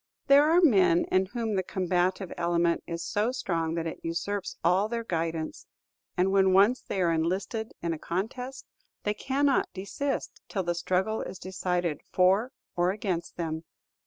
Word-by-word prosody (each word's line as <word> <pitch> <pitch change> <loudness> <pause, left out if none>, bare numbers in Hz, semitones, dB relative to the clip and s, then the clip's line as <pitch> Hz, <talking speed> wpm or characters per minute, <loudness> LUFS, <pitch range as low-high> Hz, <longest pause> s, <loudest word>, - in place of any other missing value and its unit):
There 285 +2 +6
are 340 +2 +5
men 190 - +5
in 185 0 +3
whom 225 0 -2
the 190 - +2
combative 185 0 -1
element 170 0 +1
is 170 0 -4
so 215 +4 0
strong 165 -10 -1
that 165 -1 -2
it 165 - -5
usurps 185 +4 -3
all 185 +5 +3
their 235 0 -2
guidance, 165 -5 -3 0.5
and 185 +2 +3
when 190 -1 +4
once 205 +7 +5
they 190 - -2
are 170 - +3
enlisted 190 +7 -1
in 170 -1 0
a 160 - -6
contest, 250 - -4 0.4
they 210 - +1
cannot 275 +4 +1
desist 235 +9 -3
till 190 - -1
the 175 0 0
struggle 185 +5 0
be - - -6
decided 180 -4 -2
for 195 +7 +3 0.2
or 175 0 +2
against 185 -4 -3
them. 160 -1 -3
185 Hz, 160 wpm, -28 LUFS, 170-220 Hz, 0.5 s, There